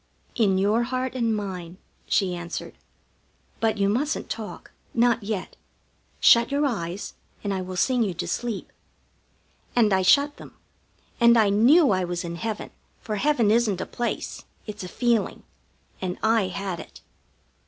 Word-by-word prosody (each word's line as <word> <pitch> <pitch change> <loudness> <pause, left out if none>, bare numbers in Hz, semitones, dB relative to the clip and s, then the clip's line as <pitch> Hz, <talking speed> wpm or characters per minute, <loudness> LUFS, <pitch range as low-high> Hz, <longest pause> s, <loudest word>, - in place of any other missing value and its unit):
"In 200 -5 +2
your 205 +4 +2
heart 255 +1 -2
and 230 -3 0
mine," 185 -4 -5 0.3
she 190 -3 +1
answered. 175 -1 -6 0.9
"But 225 -1 +1
you 200 -1 +2
mustn't 275 +9 -1
talk, 220 -2 -7 0.2
not 235 0 +3
yet. 205 -2 -4 0.6
Shut 235 0 +6
your 285 +1 +1
eyes, 195 -7 -3 0.3
and 200 -1 -1
I 190 - -2
will 185 0 -6
sing 250 +7 +2
you 195 -6 0
to - - -4
sleep." 235 -4 -3 1.0
And 220 -4 +4
I 190 - +3
shut 285 +10 +4
them. - - -13 0.6
And 235 -1 +6
I 215 -3 +4
knew 260 +10 +5
I 185 -1 +1
was 175 0 -3
in 170 0 -5
heaven, 220 +2 -4 0.3
for 215 -2 -4
heaven 240 -4 +2
isn't 220 -5 +2
a - - -3
place; 240 -1 -4 0.2
it's 210 -2 -7
a - - -5
feeling, 235 +1 0 0.6
and 185 0 -3
I 220 -3 +3
had 185 -1 -4
it. - - -12
215 Hz, 155 wpm, -25 LUFS, 190-235 Hz, 1.0 s, Shut